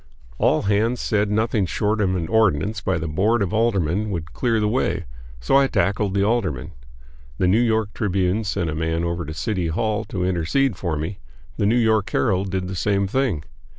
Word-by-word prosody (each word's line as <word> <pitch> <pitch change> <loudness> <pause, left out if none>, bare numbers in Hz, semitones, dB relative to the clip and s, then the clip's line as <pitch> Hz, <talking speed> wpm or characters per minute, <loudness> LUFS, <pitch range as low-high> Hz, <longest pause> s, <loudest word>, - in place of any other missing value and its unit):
All - - +3
hands 110 +4 +1
said 105 -1 0
nothing 110 -1 +1
short 105 +4 0
of 95 -2 +1
an 85 -3 -2
ordinance 105 -1 +1
by 95 0 0
the 80 -1 -3
board 100 +8 +1
of 100 - -3
aldermen 105 -3 +1
would 80 -5 -5
clear 115 -3 +1
the 105 - +1
way; 125 +5 0 0.3
so - - +3
I 140 0 +4
tackled 100 -1 0
the 100 - +2
aldermen. 100 - -1 0.7
The 90 - +2
New 105 +6 +4
York 110 -3 +1
Tribune 95 0 0
sent 100 -4 -2
a 80 - -2
man 80 +1 -1
over 85 -1 -2
to 75 - -6
the 80 - -8
City 95 -3 -1
Hall 105 +6 -1
to 90 -2 -3
intercede 95 - +1
for 85 -4 -2
me; 80 +6 -4 0.4
the 100 - +1
New 115 +3 +3
York 110 -3 +2
Herald 95 +7 +1
did 95 -1 -2
the 95 - -5
same 100 +2 +1
thing. 105 - 0
100 Hz, 200 wpm, -22 LUFS, 85-110 Hz, 0.7 s, I